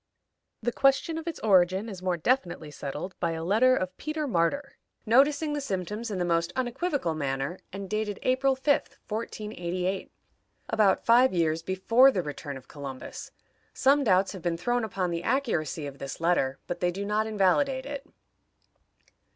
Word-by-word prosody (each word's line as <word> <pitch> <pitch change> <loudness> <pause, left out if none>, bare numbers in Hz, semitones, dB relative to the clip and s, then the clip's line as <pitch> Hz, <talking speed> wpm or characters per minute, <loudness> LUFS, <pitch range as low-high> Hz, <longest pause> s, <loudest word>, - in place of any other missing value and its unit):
The 240 - +1
question 275 +6 +2
of 325 - -10
its 335 - -4
origin 190 0 +3
is 195 -5 -7
more 185 -1 0
definitely 175 - 0
settled 145 +6 -5
by 170 -1 0
a 160 0 -4
letter 225 +8 +4
of 185 -5 -3
Peter 305 0 -3
Martyr, 275 +6 0 0.3
noticing 285 +6 +3
the 295 - -2
symptoms 210 -1 -3
in 200 - -3
the 180 - 0
most 170 -1 +1
unequivocal 260 - -1
manner, 140 +2 -2
and 195 0 -6
dated 215 -1 -2
April 265 +1 +2
5, 280 +2 0
1488, 195 -4 -3 0.6
about 210 -4 +3
five 240 -1 +5
years 165 -1 +1
before 190 +9 +4
the 190 -9 -1
return 145 -2 -6
of 130 - -14
Columbus. 140 -3 -8 0.5
Some 280 +2 +4
doubts 195 -4 +3
have 190 - -8
been 170 -1 -1
thrown 240 +7 0
upon 190 -4 -2
the 170 0 -2
accuracy 175 - -1
of 140 -1 -8
this 140 -1 -6
letter, 165 -6 +1
but 175 - -4
they 180 - +2
do 195 +3 -4
not 210 +1 0
invalidate 240 +7 +2
it. 280 -1 -5
195 Hz, 165 wpm, -28 LUFS, 170-255 Hz, 0.6 s, five